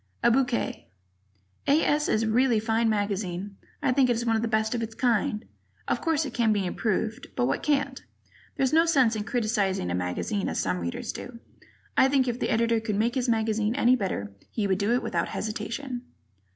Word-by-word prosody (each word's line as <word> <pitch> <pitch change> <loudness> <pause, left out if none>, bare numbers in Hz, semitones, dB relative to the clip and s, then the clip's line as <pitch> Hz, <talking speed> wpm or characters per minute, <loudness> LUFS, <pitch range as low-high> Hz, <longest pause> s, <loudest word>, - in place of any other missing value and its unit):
A - - +5
bouquet: 245 -1 0 0.8
A. 290 +3 +4
S. 295 0 +1
is 215 - +2
a - - 0
really 235 +1 +3
fine 225 +1 +1
magazine. 200 -2 -2 0.3
I 260 - +3
think 255 -1 +3
it's 235 0 0
one 225 -1 +2
of 220 - +1
the 230 - 0
best 220 0 +1
of 240 - -1
its 225 0 -5
kind. 225 -3 +1 0.4
Of - - 0
course, 320 -2 +1
it 270 - -6
can 230 -2 +2
be 205 -3 +1
improved 215 +4 -2
but 120 - +1
what 135 - 0
can't? 285 -2 0 0.5
There's 270 0 +1
no 330 +1 +5
sense 260 -8 +4
in 210 -1 -3
criticizing 210 - 0
a - - -1
magazine 90 - -2
as - - -2
some 90 -1 0
Readers 85 0 -4
do. 245 - -8 0.6
I 260 - +6
think 270 -2 +2
if 245 0 -2
the - - -1
Editor 230 0 +2
could 220 -2 -2
make 225 +4 +1
his 255 -1 0
magazine 220 0 +1
any 255 -2 +4
better, 185 - -3 0.2
he 215 - -2
would 190 -1 +1
do 205 +3 +1
it 245 - +2
without - - -1
hesitation. 235 +4 -4
225 Hz, 205 wpm, -27 LUFS, 210-250 Hz, 0.8 s, I